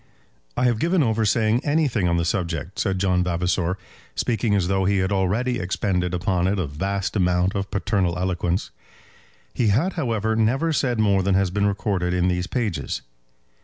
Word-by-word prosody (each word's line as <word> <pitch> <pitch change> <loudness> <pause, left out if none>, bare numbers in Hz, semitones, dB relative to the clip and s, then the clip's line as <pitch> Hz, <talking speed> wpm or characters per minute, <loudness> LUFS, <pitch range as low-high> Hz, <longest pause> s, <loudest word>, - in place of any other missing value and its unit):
"I - - +1
have 120 -3 +2
given 170 +2 +2
over 110 -2 +1
saying 110 +3 +2
anything 145 - +1
on 85 0 +1
the 85 - 0
subject," 85 0 -2
said 95 -3 0
John 90 -1 +2
Vavasor, 90 +1 0 0.4
speaking 115 -3 0
as 95 -3 +1
though 95 0 +1
he 100 +1 +2
had 95 +1 0
already 105 +6 0
expended 90 -1 -1
upon 90 0 0
it 100 +2 0
a 90 - 0
vast 95 +9 -3
amount 90 -1 +2
of 100 -1 -3
paternal 95 -3 0
eloquence. 90 0 -1 0.8
He 120 - +1
had, 130 - +2
however, 110 - -1
never 130 +9 +1
said 125 -6 0
more 100 -3 +3
than 95 0 +1
has 95 -2 +2
been 100 +1 +1
recorded 95 -3 -1
in 90 0 +2
these 90 0 -1
pages. 110 -9 -2
95 Hz, 175 wpm, -23 LUFS, 90-110 Hz, 0.8 s, more